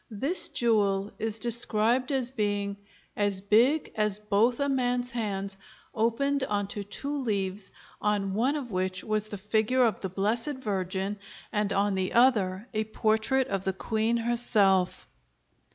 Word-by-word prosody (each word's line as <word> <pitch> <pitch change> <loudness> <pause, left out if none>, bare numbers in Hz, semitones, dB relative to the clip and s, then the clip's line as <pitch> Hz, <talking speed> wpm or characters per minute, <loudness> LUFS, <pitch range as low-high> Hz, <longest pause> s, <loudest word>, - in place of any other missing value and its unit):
This 270 - -2
jewel 205 -4 +1
is 220 0 -2
described 235 +2 +1
as 260 -2 0
being 205 -4 -1 0.4
"as 205 -2 0
big 235 +10 +3
as 210 -2 0
both 210 +3 +1
a 280 - +1
man's 250 -2 0
hands, 200 -4 -3 0.4
opened 270 +5 +1
onto 205 -3 -2
two 280 +8 -5
leaves, 200 -6 -2 0.3
on 205 -2 0
one 250 +8 +1
of 265 -6 -5
which 185 0 -2
was 215 -1 -1
the 205 - -6
figure 220 +5 +2
of 220 -4 0
the 190 - -4
Blessed 220 +9 -1
Virgin 195 -3 -2 0.3
and 210 -2 0
on 200 0 +1
the 190 -1 -1
other 215 -5 +3
a 215 0 0
portrait 220 +4 +1
of 195 -1 -1
the 190 - -1
queen 220 +4 0
herself." 215 -6 +2
215 Hz, 145 wpm, -28 LUFS, 200-240 Hz, 0.4 s, big